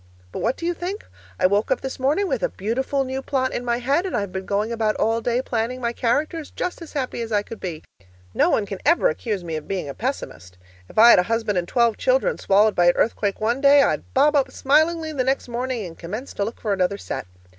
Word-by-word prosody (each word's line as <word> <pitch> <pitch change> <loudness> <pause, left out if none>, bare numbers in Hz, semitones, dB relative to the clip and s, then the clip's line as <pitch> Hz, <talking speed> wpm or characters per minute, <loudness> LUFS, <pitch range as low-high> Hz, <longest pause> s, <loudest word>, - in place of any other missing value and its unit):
But - - -5
what 240 +3 0
do 335 - -5
you 350 - +1
think? 365 +5 -5 0.3
I - - +3
woke 200 +3 +2
up 260 - +1
this 265 0 -5
morning 295 +10 +1
with - - -1
a - - +1
beautiful 260 +7 -1
new 265 0 -4
plot 260 -1 -1
in 245 - -3
my 240 -1 0
head, 275 +7 +1
and - - -2
I've 200 -2 -3
been 190 +1 -5
going 210 +3 0
about 220 -2 0
all 225 +1 +1
day 245 +2 0
planning 240 +1 -2
my 235 -1 -2
characters, 295 +7 -1
just 360 - -4
as 330 - -10
happy 255 -4 -3
as 230 -1 -5
I 205 -1 +2
could 225 - -9
be. 170 -4 -6 0.5
No - - +3
one 210 - +1
can 195 -1 -6
ever 340 - +4
accuse 220 - -3
me 165 -2 -4
of 155 - -8
being 190 -6 -3
a 140 - -5
pessimist! 90 - -5 0.3
If - - -15
I 235 +2 +9
had - - +7
a 180 - -1
husband 225 -4 0
and 175 - -4
twelve 235 -1 +2
children - - +1
swallowed 205 +2 +4
by 175 0 +3
an 175 - +6
earthquake 205 -3 0
one 235 +5 0
day, 280 0 +7
I'd - - -1
bob 295 +3 +4
up 270 -2 +2
smilingly 315 +4 +2
the 265 -3 0
next 265 +1 0
morning 245 -2 -3
and 165 -2 -9
commence 210 +12 -7
to 200 - -2
look 225 - -6
for 210 -3 -1
another 190 +1 0
set. - - -6
235 Hz, 250 wpm, -23 LUFS, 205-275 Hz, 0.5 s, I